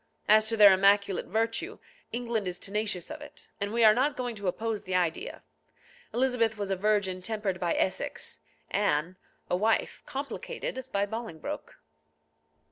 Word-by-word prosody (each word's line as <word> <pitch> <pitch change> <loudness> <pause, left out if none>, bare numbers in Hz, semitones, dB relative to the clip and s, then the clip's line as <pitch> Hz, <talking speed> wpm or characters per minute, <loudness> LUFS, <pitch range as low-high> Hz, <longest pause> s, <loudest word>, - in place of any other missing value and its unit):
As 215 +1 +6
to 225 - 0
their 205 -2 +9
immaculate 200 0 +3
virtue, 225 +3 -1 0.3
England 235 -4 -1
is 180 0 -3
tenacious 205 - -2
of 310 -1 -7
it, 295 - -8
and 200 0 -1
we 230 +1 +2
are 215 -1 +9
not 265 +5 +1
going 245 -2 -2
to 200 -3 -5
oppose 220 +3 -1
the 185 - -3
idea. 180 - -1 0.7
Elizabeth 240 -3 +1
was 200 -1 -3
a - - +2
virgin 195 -2 +1
tempered 205 -2 -2
by 175 -2 0
Essex; 185 - -2 0.3
Anne, 180 -3 +1 0.3
a - - +1
wife 220 +4 +1
complicated 275 - -5
by 200 0 +1
Bolingbroke. 220 -6 -6
210 Hz, 150 wpm, -29 LUFS, 190-230 Hz, 0.7 s, their